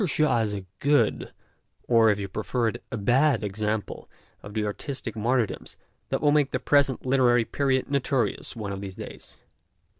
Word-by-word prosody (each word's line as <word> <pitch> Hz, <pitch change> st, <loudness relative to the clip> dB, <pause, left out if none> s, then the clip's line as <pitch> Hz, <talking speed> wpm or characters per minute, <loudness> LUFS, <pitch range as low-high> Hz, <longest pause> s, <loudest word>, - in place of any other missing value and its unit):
Shaw 155 Hz, -7 st, +2 dB
is 105 Hz, -2 st, -1 dB
a 100 Hz, -2 st, -6 dB
good, 145 Hz, +1 st, +2 dB, 0.6 s
or, 115 Hz, -2 st, +5 dB
if 105 Hz, -, +2 dB
you 100 Hz, -1 st, -4 dB
prefer 115 Hz, +4 st, -1 dB
it, 120 Hz, -, -8 dB
a 115 Hz, -, -2 dB
bad 125 Hz, +4 st, +2 dB
example 105 Hz, +1 st, -3 dB, 0.3 s
of 105 Hz, +1 st, -10 dB
the 110 Hz, -1 st, 0 dB
artistic 115 Hz, +2 st, -4 dB
martyrdoms 115 Hz, +1 st, -1 dB, 0.3 s
that -, -, -1 dB
will 145 Hz, 0 st, +4 dB
make 145 Hz, -2 st, +3 dB
the -, -, -2 dB
present 140 Hz, -3 st, +2 dB
literary 125 Hz, -3 st, +3 dB
period 135 Hz, -1 st, 0 dB
notorious 140 Hz, -3 st, -1 dB
one 105 Hz, -3 st, -5 dB
of 100 Hz, 0 st, -5 dB
these 95 Hz, -2 st, -7 dB
days. -, -, -10 dB
120 Hz, 170 wpm, -26 LUFS, 105-135 Hz, 0.6 s, or